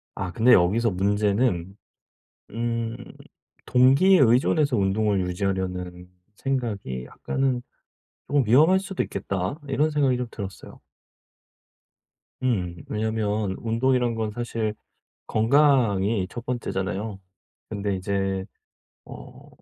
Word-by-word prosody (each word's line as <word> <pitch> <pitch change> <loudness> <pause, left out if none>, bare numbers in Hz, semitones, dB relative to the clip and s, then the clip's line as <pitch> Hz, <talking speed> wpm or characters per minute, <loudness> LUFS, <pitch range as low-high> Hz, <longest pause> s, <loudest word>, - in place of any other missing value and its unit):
아 90 - -4
근데 120 +6 +4
여기서 105 +6 +3
문제는 100 0 0 0.8
음 115 0 -2 0.7
'동기에 135 +10 +5
의존해서 130 +2 +3
운동을 100 +1 +1
유지하려는 90 -1 -3 0.3
생각이 105 - -3
약간은 130 - -2 0.7
쪼금 145 -2 +2
위험할 155 - +5
수도 195 -1 -3
있겠다.' 95 - -4
이런 150 +3 +1
생각이 140 -4 +2
좀 125 0 -3
들었어요. 95 -5 -8 1.6
음 95 -9 -1
왜냐하면 105 -2 -1
운동이란 120 +1 +1
건 110 -1 -2
사실 115 -2 -3 0.5
건강이 115 -6 +3
1 120 0 -8
번째잖아요. 100 -4 -3 0.5
근데 100 -2 -2
이제 95 0 -2 0.6
어 - - -12
110 Hz, 230 characters per minute, -24 LUFS, 95-125 Hz, 1.6 s, 동기에